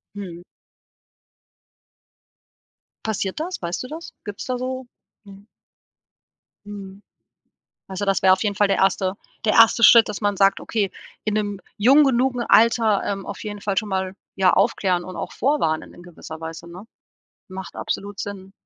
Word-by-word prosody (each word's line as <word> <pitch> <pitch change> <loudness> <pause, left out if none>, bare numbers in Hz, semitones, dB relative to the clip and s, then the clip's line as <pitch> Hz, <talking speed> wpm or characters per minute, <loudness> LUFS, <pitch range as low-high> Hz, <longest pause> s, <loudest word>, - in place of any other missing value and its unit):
Mhm. 175 -4 -8 2.6
Passiert 200 -1 -2
das? 355 +4 -4
Weißt 175 +3 -3
du - - -7
das? 320 +5 -9
Gibt's 205 -1 -7
da 255 -1 -2
so 255 0 -4 0.4
Mhm. 200 0 -14 1.2
Mhm. 200 -1 -9 0.9
Weil 190 - -8
so, 205 - -1
das 195 -1 +1
wäre 190 0 +6
auf 185 - +2
jeden 205 -2 0
Fall 205 +1 +2
der 195 - +2
1. 190 0 +1 0.3
der 215 - +2
1. 230 +1 +6
Schritt, 230 0 +8
dass 210 - -5
man 205 -1 0
sagt: 195 0 +3
„Okay, 205 -4 -1 0.3
in 215 - -1
'nem 205 -2 -2 0.2
jung 270 +8 +6
genugen 255 -1 +1
Alter, 225 -3 +4
ähm, 195 -1 -3
auf 200 - -7
jeden 205 -1 -6
Fall 200 -1 -2
schon 210 +3 0
mal, 190 -1 -2 0.2
ja, 190 -2 +4
aufklären 185 -2 +1
und 185 0 -8
auch - - -5
vorwarnen 240 - 0
in 175 - -14
gewisser 160 -2 -10
Weise“, 165 +1 -8
ne? 180 +4 -10 0.6
Macht 185 -2 -8
absolut 200 0 -4
Sinn. 195 -1 -7
200 Hz, 160 wpm, -22 LUFS, 190-225 Hz, 2.6 s, Schritt